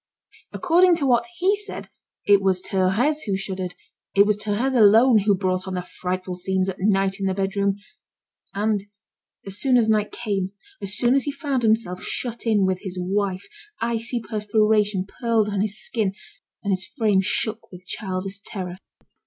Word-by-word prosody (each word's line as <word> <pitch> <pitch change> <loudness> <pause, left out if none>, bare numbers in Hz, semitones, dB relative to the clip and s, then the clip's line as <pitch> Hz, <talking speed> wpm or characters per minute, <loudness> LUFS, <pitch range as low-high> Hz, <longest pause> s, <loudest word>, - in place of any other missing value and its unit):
According 360 0 +4
to 310 -4 -1
what 245 +1 +3
he 380 +3 +3
said, 415 0 -5 0.4
it 200 -1 +5
was 190 -1 +2
Thérèse 220 +12 +1
who 195 -2 0
shuddered, 190 -2 -4 0.4
it 200 0 +7
was 210 0 +2
Thérèse 215 +6 -1
alone 225 +2 +6
who 205 0 +3
brought 185 0 -1
on 190 - -3
the 180 - -2
frightful 185 +1 -4
scenes, 185 +1 -1
at 190 0 -4
night, 195 0 +1
in 195 - -1
the 190 - 0
bedroom. 200 0 0 0.8
And, 210 0 +1 0.6
as 195 0 -7
soon 260 -2 +3
as 230 -2 +3
night 215 -1 +2
came, 200 -5 -3 0.3
as 200 +1 -1
soon 245 0 +3
as 275 -1 +2
he 290 - -1
found 280 -3 -2
himself 220 -5 +1
shut 235 -1 -4
in 210 -3 +3
with 185 -1 0
his 185 -2 -5
wife, 190 +1 -1 0.3
icy 230 +1 -1
perspiration 210 -2 +1
pearled 225 0 0
on 200 -2 -1
his 205 0 -2
skin, 210 -5 -2 0.5
and 200 - -1
his 185 0 -1
frame 215 -7 +2
shook 220 +3 -2
with 180 0 -12
childish 190 0 -4
terror. 185 -3 -6
205 Hz, 170 wpm, -23 LUFS, 190-230 Hz, 0.8 s, it